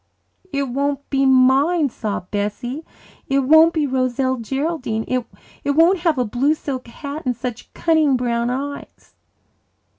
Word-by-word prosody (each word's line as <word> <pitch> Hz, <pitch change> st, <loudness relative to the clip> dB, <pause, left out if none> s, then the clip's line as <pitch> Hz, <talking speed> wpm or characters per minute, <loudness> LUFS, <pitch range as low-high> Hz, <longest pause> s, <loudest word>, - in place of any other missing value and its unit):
"It 280 Hz, 0 st, 0 dB
won't 280 Hz, +2 st, -2 dB
be 275 Hz, -1 st, +2 dB
mine," 270 Hz, +5 st, +4 dB
sobbed 205 Hz, -5 st, -5 dB
Bessie. 215 Hz, +8 st, -3 dB, 0.4 s
"It 275 Hz, 0 st, +2 dB
won't 315 Hz, +5 st, +6 dB
be 315 Hz, -3 st, 0 dB
Roselle 260 Hz, 0 st, 0 dB
Geraldine. 255 Hz, -2 st, -2 dB
It 255 Hz, -2 st, -1 dB, 0.5 s
won't 340 Hz, +4 st, +5 dB
have 330 Hz, -4 st, +1 dB
a 250 Hz, -, +1 dB
blue 260 Hz, +8 st, +1 dB
silk 265 Hz, -5 st, -5 dB
hat 285 Hz, +5 st, -7 dB
and 250 Hz, -2 st, -1 dB
such 245 Hz, 0 st, -6 dB
cunning 310 Hz, -5 st, +3 dB
brown 235 Hz, -1 st, -1 dB
eyes." 280 Hz, +3 st, -6 dB
270 Hz, 140 wpm, -20 LUFS, 245-295 Hz, 0.5 s, won't